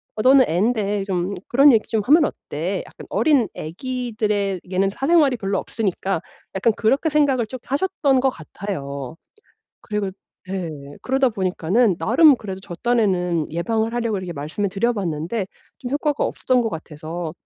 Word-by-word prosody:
어 215 Hz, -, -2 dB
너는 260 Hz, +1 st, +6 dB
앤데 205 Hz, +2 st, 0 dB
좀 190 Hz, 0 st, -2 dB
그런 275 Hz, +1 st, +6 dB
얘기 220 Hz, -, +1 dB
좀 220 Hz, -2 st, +1 dB
하면 305 Hz, +3 st, +6 dB
어때?" 180 Hz, -, -3 dB
약간 -, -, -12 dB
어린 235 Hz, -, +3 dB
아기들에게는 200 Hz, -2 st, -2 dB
사생활이 280 Hz, +3 st, +3 dB
별로 195 Hz, -3 st, -2 dB
없으니까 195 Hz, -4 st, -2 dB, 0.3 s
약간 225 Hz, +4 st, +3 dB
그렇게 270 Hz, +8 st, +2 dB
생각을 280 Hz, -6 st, +2 dB
쭉 255 Hz, +3 st, -8 dB
하셨던 280 Hz, -3 st, +1 dB
것 265 Hz, -, +3 dB
같아요. 150 Hz, -, -6 dB, 0.6 s
그리고 210 Hz, -3 st, -3 dB, 0.4 s
예. 185 Hz, -3 st, -3 dB, 0.3 s
그러다 265 Hz, 0 st, +2 dB
보니까는 190 Hz, +1 st, +1 dB
나름 275 Hz, -, +5 dB
그래도 195 Hz, -5 st, -7 dB
저 180 Hz, -3 st, -8 dB
딴에는 185 Hz, -9 st, +1 dB
예방을 220 Hz, +7 st, -1 dB
하려고 230 Hz, -4 st, 0 dB
이렇게 185 Hz, -2 st, -5 dB
말씀을 160 Hz, +8 st, -3 dB
드려봤는데 195 Hz, -2 st, -1 dB, 0.3 s
좀 245 Hz, -, -5 dB
효과가 295 Hz, 0 st, 0 dB
없었던 250 Hz, -1 st, +1 dB
것 225 Hz, -, -1 dB
같아서 160 Hz, 0 st, -6 dB
210 Hz, 340 characters per minute, -22 LUFS, 185-250 Hz, 0.6 s, 너는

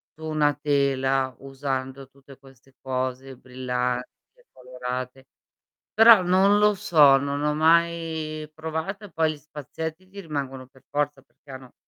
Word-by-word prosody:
su 160 Hz, -, -10 dB
una 150 Hz, -2 st, +1 dB
tela, 135 Hz, -2 st, 0 dB
usando 135 Hz, -1 st, -5 dB
tutte 135 Hz, 0 st, -17 dB
queste 135 Hz, -1 st, -21 dB
cose 130 Hz, 0 st, -4 dB
brillanti 125 Hz, 0 st, -3 dB, 0.3 s
e -, -, -27 dB
colorate?" 125 Hz, +1 st, -7 dB, 0.7 s
Però 225 Hz, -3 st, +8 dB
non 190 Hz, +3 st, +4 dB
lo 210 Hz, 0 st, +4 dB
so, 155 Hz, -9 st, +5 dB
non 140 Hz, +1 st, -3 dB
ho 150 Hz, 0 st, 0 dB
mai 160 Hz, -1 st, +1 dB
provato 160 Hz, +6 st, -5 dB
e 200 Hz, -, -14 dB
poi 160 Hz, -1 st, +1 dB
gli -, -, -12 dB
spazietti 155 Hz, +4 st, -8 dB
ti 200 Hz, +1 st, -11 dB
rimangono 135 Hz, -6 st, -5 dB
per 130 Hz, 0 st, -23 dB
forza, 145 Hz, -1 st, -2 dB
perché 140 Hz, -, -29 dB
hanno 130 Hz, -1 st, -11 dB
140 Hz, 140 wpm, -24 LUFS, 130-160 Hz, 0.7 s, Però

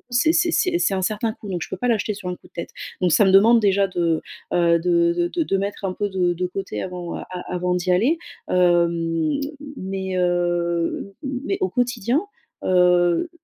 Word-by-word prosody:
coup, -, -, -38 dB
c'est 245 Hz, +6 st, +3 dB
c'est 340 Hz, +1 st, +2 dB, 0.3 s
c'est 205 Hz, -, +1 dB
un 190 Hz, -, -1 dB
certain 215 Hz, +4 st, -1 dB
coût 215 Hz, -, -11 dB
donc 180 Hz, -3 st, -3 dB
je -, -, -5 dB
peux -, -, -5 dB
pas 245 Hz, -, -1 dB
l'acheter 215 Hz, -2 st, +1 dB
sur 195 Hz, -2 st, -7 dB
un 180 Hz, -, -3 dB
coup -, -, -20 dB
de -, -, -44 dB
tête, 170 Hz, -, -6 dB, 0.3 s
donc 180 Hz, -1 st, +2 dB
ça 205 Hz, -, +5 dB
me 190 Hz, -, +4 dB
demande 220 Hz, +5 st, +7 dB
déjà 200 Hz, -2 st, +3 dB
de, 170 Hz, -3 st, 0 dB, 0.3 s
heu, 170 Hz, -1 st, +3 dB
de 170 Hz, 0 st, +2 dB
de 340 Hz, -, +1 dB
de 195 Hz, -, 0 dB
mettre 200 Hz, +1 st, -4 dB
un 185 Hz, -, -3 dB
peu 205 Hz, +1 st, -2 dB
de 180 Hz, -2 st, +1 dB
de 180 Hz, +1 st, -2 dB
côté 195 Hz, +2 st, -5 dB
avant 180 Hz, -2 st, -5 dB
a -, -, -6 dB, 0.3 s
avant 180 Hz, 0 st, -1 dB
d'y 180 Hz, 0 st, -1 dB
aller, 235 Hz, -, +3 dB, 0.3 s
hem, 170 Hz, -, +2 dB
m 280 Hz, -, -3 dB, 0.3 s
mais, 190 Hz, -1 st, -4 dB
heu, 175 Hz, +1 st, 0 dB
mais 275 Hz, +7 st, -3 dB
au 380 Hz, -, +1 dB
quotidien, 245 Hz, +1 st, 0 dB, 0.4 s
heu, 180 Hz, -, +3 dB
185 Hz, 205 wpm, -22 LUFS, 175-215 Hz, 0.4 s, demande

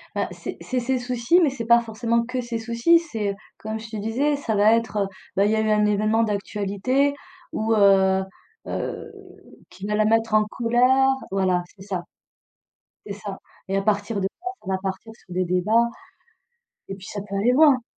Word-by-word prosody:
Bah, -, -, -1 dB
c'est -, -, -7 dB
c'est 255 Hz, -1 st, -2 dB
ses 255 Hz, +2 st, 0 dB
soucis 250 Hz, +7 st, +2 dB
mais 295 Hz, -, +4 dB
c'est 235 Hz, -4 st, -5 dB
pas 235 Hz, 0 st, +6 dB
forcément 230 Hz, +1 st, 0 dB
que 250 Hz, +1 st, -3 dB
ses 235 Hz, -1 st, -3 dB
soucis, 235 Hz, +9 st, +3 dB
c'est 220 Hz, -11 st, -3 dB, 0.2 s
comme 220 Hz, +1 st, -5 dB
je 225 Hz, -, -10 dB
te 220 Hz, -, -5 dB
disais 260 Hz, +8 st, 0 dB
ça 225 Hz, -6 st, -2 dB
va 210 Hz, +2 st, +5 dB
être, 230 Hz, -2 st, 0 dB
heu, 200 Hz, -1 st, +1 dB, 0.3 s
bah 195 Hz, -, +3 dB
il 210 Hz, -, +2 dB
y -, -, +2 dB
a -, -, +2 dB
eu 215 Hz, 0 st, +1 dB
un 210 Hz, 0 st, +3 dB
événement 215 Hz, +2 st, +2 dB
d'actualité 210 Hz, +6 st, 0 dB, 0.4 s
ou 220 Hz, +1 st, 0 dB
heu 190 Hz, -2 st, +5 dB, 0.4 s
heu, -, -, -4 dB, 0.6 s
qui 190 Hz, -, -9 dB
va 210 Hz, 0 st, -1 dB
la 215 Hz, 0 st, +3 dB
mettre 225 Hz, 0 st, +2 dB
en 215 Hz, 0 st, +5 dB
colère 250 Hz, +4 st, +3 dB, 0.2 s
voilà 185 Hz, -2 st, +1 dB
c'est 190 Hz, -, -17 dB
ça. 185 Hz, -4 st, -4 dB, 1.0 s
C'est 200 Hz, -, -5 dB
ça 200 Hz, -1 st, -7 dB, 0.3 s
et 195 Hz, +1 st, 0 dB
à -, -, +1 dB
partir 205 Hz, +1 st, 0 dB
de -, -, -3 dB
là, 355 Hz, -, -4 dB
ça -, -, -16 dB
va 190 Hz, -, +1 dB
partir 195 Hz, +3 st, -5 dB
sur 180 Hz, -, -13 dB
des 185 Hz, 0 st, 0 dB
débats 215 Hz, +7 st, +2 dB, 1.0 s
et 195 Hz, -, -4 dB
puis 190 Hz, -1 st, -13 dB
ça 205 Hz, -, -5 dB
peut 200 Hz, -1 st, -7 dB
aller 220 Hz, +5 st, +3 dB
loin! 275 Hz, -4 st, +5 dB
220 Hz, 200 wpm, -23 LUFS, 200-240 Hz, 1.0 s, pas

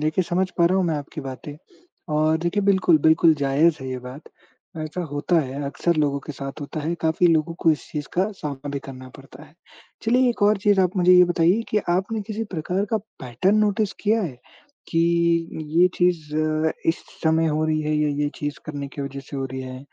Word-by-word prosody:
देखिए, 155 Hz, +4 st, +1 dB
समझ 185 Hz, +2 st, 0 dB
पा 170 Hz, -, +5 dB
रहा 185 Hz, +2 st, +2 dB
हूँ 190 Hz, -, +2 dB
मैं 160 Hz, -, 0 dB
आपकी 145 Hz, +2 st, -7 dB
बातें 135 Hz, +2 st, -7 dB, 0.6 s
और 155 Hz, +1 st, +3 dB
देखिए, 175 Hz, +5 st, -1 dB
बिल्कुल, 190 Hz, -4 st, +4 dB
बिल्कुल 160 Hz, +2 st, +5 dB
जायज़ 145 Hz, +3 st, +2 dB
है 130 Hz, -, -6 dB
ये 130 Hz, 0 st, -4 dB
बात, 125 Hz, +4 st, -10 dB, 0.6 s
ऐसा 155 Hz, +3 st, -4 dB
होता 145 Hz, +4 st, +1 dB
है 140 Hz, +1 st, -5 dB
अक्सर 170 Hz, +4 st, -1 dB
लोगों 145 Hz, -2 st, +1 dB
के 150 Hz, -, -5 dB
साथ 135 Hz, +1 st, -7 dB
होता 150 Hz, +2 st, -5 dB
है, 160 Hz, +3 st, -2 dB
काफ़ी 160 Hz, +2 st, +2 dB
लोगों 165 Hz, 0 st, +2 dB
को 165 Hz, -, +4 dB
इस 150 Hz, -, -2 dB
चीज़ 150 Hz, -2 st, -4 dB
का 190 Hz, +4 st, +1 dB
सामना 145 Hz, -4 st, -6 dB
भी 140 Hz, -, -3 dB
करना 130 Hz, -1 st, -9 dB
पड़ता 135 Hz, 0 st, -14 dB
है। 150 Hz, -, -21 dB, 0.5 s
चलिए 250 Hz, +3 st, +3 dB
एक 235 Hz, -, -5 dB
और 210 Hz, 0 st, +5 dB
चीज़ 205 Hz, -1 st, +3 dB
आप 185 Hz, +1 st, +1 dB
मुझे 180 Hz, 0 st, +5 dB
ये 180 Hz, 0 st, +8 dB
बताइए 175 Hz, +4 st, +2 dB
कि 215 Hz, -, +2 dB
आपने 195 Hz, +5 st, 0 dB
किसी 225 Hz, +1 st, -3 dB
प्रकार 180 Hz, +5 st, -1 dB
का 220 Hz, -, +2 dB, 0.2 s
पैटर्न 130 Hz, -, +1 dB
नोटिस 210 Hz, -1 st, +1 dB
किया 220 Hz, +2 st, +2 dB
है? 135 Hz, -10 st, -5 dB, 0.5 s
कि, 165 Hz, -, 0 dB, 0.8 s
ये 180 Hz, -, +7 dB
चीज़ 165 Hz, -4 st, 0 dB
अ, 155 Hz, 0 st, +1 dB, 0.2 s
इस 165 Hz, -, 0 dB, 0.2 s
समय 160 Hz, +1 st, +3 dB
हो 155 Hz, 0 st, 0 dB
रही 155 Hz, 0 st, 0 dB
है, 155 Hz, 0 st, -1 dB
ये 150 Hz, 0 st, +1 dB
ये 145 Hz, -, +1 dB
चीज़ 145 Hz, 0 st, -4 dB
करने 145 Hz, -2 st, -5 dB
की 140 Hz, -, -6 dB
वजह 140 Hz, 0 st, -6 dB
से 140 Hz, +1 st, -9 dB
हो 135 Hz, -, -2 dB
रही 130 Hz, -, -4 dB
है 130 Hz, +1 st, -8 dB
155 Hz, 215 wpm, -23 LUFS, 145-180 Hz, 0.8 s, ये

